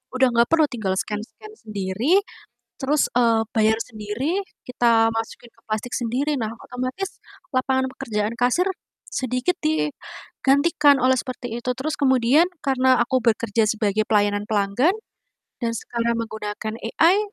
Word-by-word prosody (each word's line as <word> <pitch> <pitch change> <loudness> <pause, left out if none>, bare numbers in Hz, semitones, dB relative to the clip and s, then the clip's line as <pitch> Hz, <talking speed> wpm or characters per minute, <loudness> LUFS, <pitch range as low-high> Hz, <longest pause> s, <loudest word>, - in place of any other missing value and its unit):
udah 260 0 +4
gak 235 0 +3
perlu 325 -1 +5
tinggal 205 -6 -2
scan 210 +2 -2
scan 425 - -14
sendiri, 215 - +1 0.6
terus, 285 +2 +2
eee, 230 -2 +4
bayar 220 0 +3
sendiri, 230 - -3 0.2
kita 235 -2 +3
masukin 225 +1 -5
ke 225 - -28
plastik 220 +3 -3
sendiri 255 +5 -1
nah 225 -3 -3
otomatis, 255 +11 -5 0.4
lapangan 260 0 +1
pekerjaan 210 0 -2
kasir, 255 +10 +2 0.4
sedikit 255 +7 -1
digantikan 275 - +1
oleh 260 +1 +4
seperti 245 -2 -5
itu, 250 - -3
terus 290 +5 -3
kemudian 265 +3 +4 0.2
karena 260 -2 +3
aku 240 +2 +1
bekerja 225 -1 +2
sebagai 215 -1 0
pelayanan 205 -1 +1
pelanggan, 215 - +2 0.7
dan 235 -2 -1
sekarang 235 +1 -2
menggunakan 220 -1 -5 0.2
AI, 355 +5 +5
235 Hz, 130 wpm, -23 LUFS, 220-265 Hz, 0.7 s, perlu